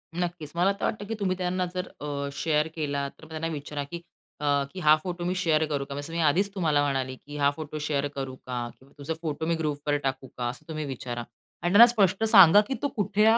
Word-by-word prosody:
नक्कीच, 175 -4 -3
मला 180 +3 +3
तर 200 - -9
वाटतं, 205 -1 -2
की 220 - -4
तुम्ही 190 -2 0
त्यांना 180 0 -1
जर 180 0 -3
अ, 140 -1 -3
शेअर 155 +1 +1
केला 140 -3 -1
तर 160 - -16
त्यांना 160 0 -3
विचारा, 145 -2 -4
की 170 +5 -7 0.4
अ, 145 -1 +2
"की 190 - -6
हा 155 -3 +6
फोटो 175 -1 -4
मी 180 +1 0
शेअर 160 -4 +2
करू 140 -2 -1
का?" 140 - -7
जसं 145 +3 -7
मी 170 - -2
आधीच 195 +7 +2
तुम्हाला 155 -6 +2
म्हणाली, 135 -2 -1
की 145 +3 -10
"हा 140 -1 +4
फोटो 155 0 -6
शेअर 145 -1 0
करू 135 -1 -4
का? 125 -2 -5
किंवा 135 +1 -21
तुझे 145 +3 -3
फोटो 160 -1 -3
मी 165 +1 +1
ग्रुपवर 145 -2 -1
टाकू 135 0 -2
का?" 120 - -1
असं 135 +5 -9
तुम्ही 155 -2 -4
विचारा 120 -3 -5 0.4
आणि 175 - 0
त्यांना 225 +4 +11
स्पष्ट 205 -4 +2
सांगा, 205 -3 +8
की 270 - -1
तो 285 - +1
कुठल्या 210 -1 +3
155 Hz, 230 wpm, -27 LUFS, 140-180 Hz, 0.4 s, त्यांना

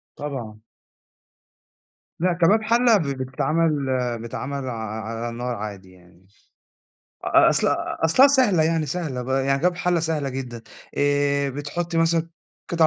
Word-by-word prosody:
طبعًا. 125 -7 -6 1.6
لأ، 180 +2 +2
كباب 180 +6 +3
حَلة 230 0 +4
ب - - -1
بيتعمل 140 +3 0 0.4
بيتعمل 130 +3 -5
ع - - -3
ع 110 -1 -5
على 115 +1 -4
النار 120 +1 -4
عادي 100 -3 -7
يعني 90 -1 -20
مش 100 +1 -32 0.8
أ - - +5
أصل - - +2
أ - - -2
أصلها 255 - +6
سهلة 245 - +3
يعني 160 -1 +1
سهلة 145 -5 -3
ب 125 - -8
يعني 135 +1 +1
كباب 180 +5 +1
حَلة 180 -1 +1
سهلة 155 -4 -1
جدًا. 125 -3 -6 0.4
آآ 145 0 +1
بتحُطّي 165 +5 -3
مثلًا 165 0 +2 0.4
قِطَع 165 -2 +4
145 Hz, 145 wpm, -23 LUFS, 125-165 Hz, 1.6 s, أصلها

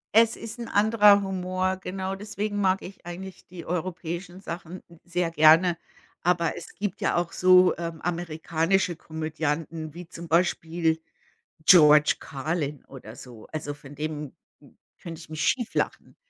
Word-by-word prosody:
Es 230 0 +6
ist 225 +1 -8
'n 235 - -5
anderer 210 -1 +5
Humor, 185 0 -2
genau, 190 0 -4
deswegen 205 +1 -4
mag 190 0 +2
ich 190 -1 -11
eigentlich 180 +2 -8
die 175 -2 -10
europäischen 175 +1 -4
Sachen 175 0 -7 0.2
sehr 175 -1 -1
gerne, 165 +2 +5 0.4
aber 175 -2 +1
es - - -9
gibt 205 -3 -4
ja - - +1
auch 175 -1 -1
so, 185 0 +5
ähm, 165 -2 -5
amerikanische 170 +1 0
Komödianten, 160 0 -4
wie 175 0 -9
zum 170 0 -9
Beispiel 165 -1 +1 0.6
George 150 -4 +7
Carlin 145 +1 -4
oder 120 -5 -11
so. 120 -4 -12
Also, 145 -2 -4
von 145 0 -13
dem 150 -1 -5 0.7
könnte 165 -2 -8
ich 160 - -13
mich 155 0 -5
schief 240 -3 0
lachen. - - -2
170 Hz, 145 wpm, -26 LUFS, 160-185 Hz, 0.7 s, George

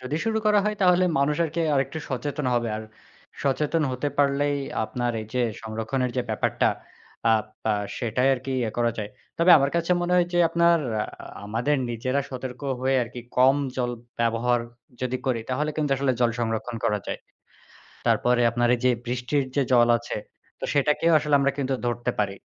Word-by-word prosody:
যদি 130 +4 -3
শুরু 220 -1 +1
করা 210 -1 +5
হয় 210 0 0
তাহলে 180 0 +5
মানুষ 145 +2 +2
আরকি 165 +1 -3
আরেকটু 140 +3 0
সচেতন 140 +2 -3
হবে। 120 -1 0
আর 110 - -5 0.6
সচেতন 150 +3 +1
হতে 125 +3 -1
পারলেই 145 0 +2 0.3
আপনার 120 +2 -2
এই 110 - -7
যে, 125 - +2 0.2
সংরক্ষণের 115 +4 -2
যে, 125 - +1
ব্যাপারটা, 110 - +1 0.6
আ - - +6 0.3
পা 110 - +2 0.3
সেটাই 125 +2 +1
আরকি 135 +1 -5
ইয়ে 115 -3 -1
করা 120 -1 +2
যায়। 105 -1 -4 0.3
তবে 170 +2 +5
আমার 140 0 +1
কাছে 170 +1 -1
মনে 175 0 -1
হয় 175 -1 +4
যে, 175 - +1
আপনার 170 0 +4 0.7
আমাদের 115 +8 0
নিজেরা 130 +4 -1
সতর্ক 130 -1 -6 0.2
হয়ে 135 +1 +2
আরকি, 120 +1 -7 0.2
কম 130 +2 +6 0.2
জল 125 -1 0 0.3
ব্যবহার 115 +1 +2 0.4
যদি 125 0 -1
করি, 125 -3 +1
তাহলে 150 +4 0
কিন্তু 150 -2 0
আসলে 135 -1 +1
জল 120 - +4
সংরক্ষণ 115 +1 -2
করা 105 - +2
যায়। - - -3 0.9
তারপরে 125 0 +3
আপনার 120 +1 +1
এই 120 - -4
যে, 130 - +5 0.2
বৃষ্টির 125 +4 0
যে, 140 - +4
জল 120 -1 +6
আছে, 120 - -6 0.4
তো - - -4
সেটাকেও 150 +4 +2
আসলে 150 -1 0
আমরা 140 0 +2
কিন্তু 135 -1 0
ধরতে 120 +1 -1
পারি। 100 -2 -1
130 Hz, 175 wpm, -25 LUFS, 120-145 Hz, 0.9 s, আ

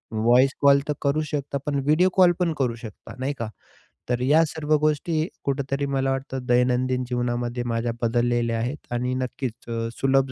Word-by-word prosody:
Voice 120 +4 +4
call 140 0 +6
तर 150 - +1
करूच 150 +2 +1
शकता 140 -1 -2
पण 145 -2 0
व्हिडिओ 165 +5 +4
कॉल 180 -2 +6
पण 170 -3 +1
करू 120 -3 +1
शकता, 115 -3 -10
नाही 135 +2 -1
का? 115 -2 -3 0.6
तर 125 0 +1
या 150 +5 +5
सर्व 155 0 0
गोष्टी 155 +2 0 0.2
कुठेतरी 140 0 -1
मला 135 -1 0
वाटतं 135 -1 -4
दैनंदिन 125 +1 +2
जीवनामध्ये 120 0 -2
माझ्या 115 0 -1
बदललेल्या 120 0 +1
आहेत 125 +6 -2 0.2
आणि 125 +1 -1
नक्कीच 130 -1 -3 0.2
अ, 115 0 -2
सुलभ 135 -1 +2
130 Hz, 170 wpm, -24 LUFS, 120-145 Hz, 0.6 s, कॉल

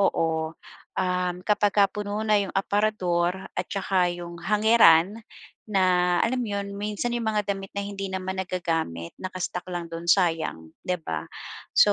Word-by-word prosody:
Oo, 160 -4 +1 0.4
um, 180 -1 0
kapagka 205 -1 +3
puno 210 +1 -3
na 210 -1 +4
yung 195 - -4
aparador 190 -4 +1 0.2
at 180 - -2
tsaka 190 -2 +1
yung 175 -1 -8
hangeran 210 -1 +5 0.5
na 180 -3 +3
alam 250 +2 0
mo 235 - -2
yun? 200 0 -4
Minsan 210 +4 -2
yung 235 -1 -2
mga 210 -2 0
damit 195 0 -7
na 200 - -1
hindi 195 -1 -4
naman 190 0 -3
nagagamit, 165 - -2
naka-stock 185 -1 -4
lang 175 -1 -3
do'n, 165 +1 -6
sayang 165 - +1
'di 180 - -1
ba? - - -4 0.5
So, - - +7
190 Hz, 150 wpm, -26 LUFS, 175-205 Hz, 0.5 s, So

